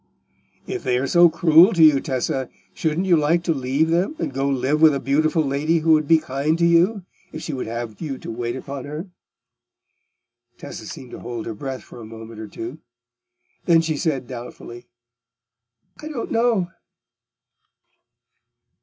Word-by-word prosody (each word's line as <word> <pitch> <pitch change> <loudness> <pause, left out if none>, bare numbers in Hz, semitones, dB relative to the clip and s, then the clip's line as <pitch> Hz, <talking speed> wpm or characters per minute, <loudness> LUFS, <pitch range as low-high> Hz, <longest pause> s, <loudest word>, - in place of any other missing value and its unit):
"If - - -5
they 125 -1 +1
are 130 - -1
so 175 +4 +6
cruel 165 +4 +5
to 170 -3 +4
you, 150 -3 +7
Tessa, 130 -1 -2 0.2
shouldn't 160 +3 -1
you 180 -2 +4
like 165 +2 +2
to 170 - +1
leave 135 +3 0
them, 180 - +1
and - - -3
go 135 +1 0
and 135 - 0
live 145 +5 0
with 155 -3 +6
a - - -1
beautiful 155 +4 +1
lady 145 +4 +1
who 160 0 +2
would 155 -2 +4
be 165 - +6
kind 150 +2 -1
to 170 - +2
you, 175 +5 +3 0.3
if 155 - -7
she 155 - -4
would 130 - -4
have 115 -1 -6
you 145 -5 -4
to - - -8
wait 120 +1 -3
upon 135 0 -7
her?" 155 +6 -7 1.5
Tessa - - -9
seemed 125 -2 -9
to - - -8
hold 120 -2 -6
her 115 - -4
breath 130 +3 -6
for 120 - -12
a - - -9
moment 110 0 -10
or 110 - -6
two. 345 - -8 0.9
Then 165 -2 +5
she 160 -1 -2
said 140 -4 -1
doubtfully, 120 -1 -9 1.1
"I 305 - -7
don't 285 -7 -5
know." 225 -6 +1
150 Hz, 175 wpm, -22 LUFS, 130-165 Hz, 1.5 s, you